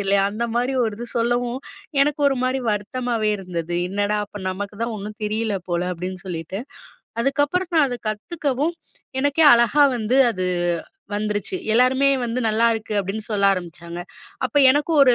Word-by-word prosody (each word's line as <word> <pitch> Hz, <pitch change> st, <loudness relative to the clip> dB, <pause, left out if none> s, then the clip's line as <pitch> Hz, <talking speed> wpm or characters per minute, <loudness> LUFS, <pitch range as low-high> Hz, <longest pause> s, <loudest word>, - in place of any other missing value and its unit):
தெரியலயா?" 195 Hz, 0 st, +2 dB
அந்த 235 Hz, +3 st, -2 dB
மாரி 250 Hz, +2 st, +1 dB
ஒரு 220 Hz, -2 st, -2 dB
இது 240 Hz, -, -5 dB
சொல்லவும், 240 Hz, +2 st, 0 dB, 0.4 s
எனக்கு 295 Hz, +1 st, 0 dB
ஒருமாரி 260 Hz, -1 st, 0 dB
வருத்தமாவே 220 Hz, +1 st, -1 dB
இருந்தது. 175 Hz, -2 st, -4 dB
"என்னடா! 205 Hz, +2 st, 0 dB
அப்ப 205 Hz, 0 st, -9 dB
நமக்கு 200 Hz, +2 st, -5 dB
தான் 230 Hz, -1 st, -2 dB
ஒண்ணும் 210 Hz, +2 st, -7 dB
தெரியல 215 Hz, -1 st, -1 dB
போல." 175 Hz, +1 st, 0 dB
அப்பிடின்னு 185 Hz, +2 st, -6 dB
சொல்லிட்டு, 175 Hz, +2 st, -4 dB, 0.6 s
அதுக்கப்பறம் 290 Hz, +7 st, 0 dB
நான் 300 Hz, -3 st, +5 dB
அதை 245 Hz, -1 st, -4 dB
கத்துக்கவும், 290 Hz, +6 st, -2 dB, 0.5 s
எனக்கே 285 Hz, +3 st, +3 dB
அழகா 235 Hz, +5 st, +4 dB
வந்து 240 Hz, +4 st, +1 dB
அது 185 Hz, -2 st, -2 dB, 0.7 s
வந்துருச்சு. 210 Hz, -, -2 dB, 0.2 s
எல்லாருமே 260 Hz, +3 st, +4 dB, 0.2 s
வந்து, 235 Hz, +2 st, -2 dB
"நல்லா 225 Hz, +2 st, +3 dB
இருக்கு." 220 Hz, -1 st, -5 dB
அப்பிடின்னு 200 Hz, +3 st, -5 dB
சொல்ல 200 Hz, -1 st, +3 dB
ஆரம்பிச்சாங்க. 170 Hz, -1 st, -7 dB, 0.5 s
அப்போ 290 Hz, -, +1 dB
எனக்கும் 295 Hz, +2 st, +2 dB
ஒரு 250 Hz, -2 st, +5 dB
225 Hz, 150 wpm, -22 LUFS, 200-260 Hz, 0.7 s, நான்